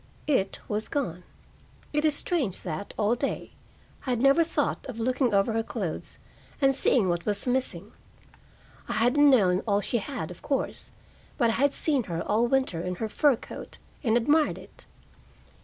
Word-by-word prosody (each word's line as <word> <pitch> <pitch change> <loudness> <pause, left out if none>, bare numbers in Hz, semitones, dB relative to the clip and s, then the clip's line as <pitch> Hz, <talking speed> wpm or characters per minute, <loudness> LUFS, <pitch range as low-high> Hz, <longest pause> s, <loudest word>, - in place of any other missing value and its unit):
It 225 -10 +1
was 215 +1 -2
gone. 180 - -3 0.7
It 300 +1 +1
is 305 -2 +3
strange 280 - -1
that, 170 +2 -5
all 210 +2 +2
day, 270 +3 -3 0.6
I - - -1
had 245 -2 +1
never 275 +6 +5
thought 330 - -1
of 240 -3 -6
looking 255 +2 +1
over 200 +2 +2
her 225 - +1
clothes - - -4 0.4
and 270 -1 +4
seeing 255 -5 +2
what 175 +1 -1
was 205 -1 -1
missing. 260 +1 -1 1.0
I - - -1
hadn't 250 +6 +4
known 190 -9 +4
all 200 -1 +3
she 235 +3 -1
had, 210 - -5
of 175 - -12
course, 275 -2 -3 0.5
but 235 -4 +3
I - - -1
had 280 +4 +2
seen 280 -7 0
her 170 -2 -3
all 225 +3 +2
winter 260 -10 +1
in 180 +1 -3
her 220 +5 -3
fur 285 +5 +3
coat - - -10 0.3
and 230 -2 +3
admired 295 +6 +2
it. - - -13
235 Hz, 175 wpm, -27 LUFS, 200-275 Hz, 1.0 s, never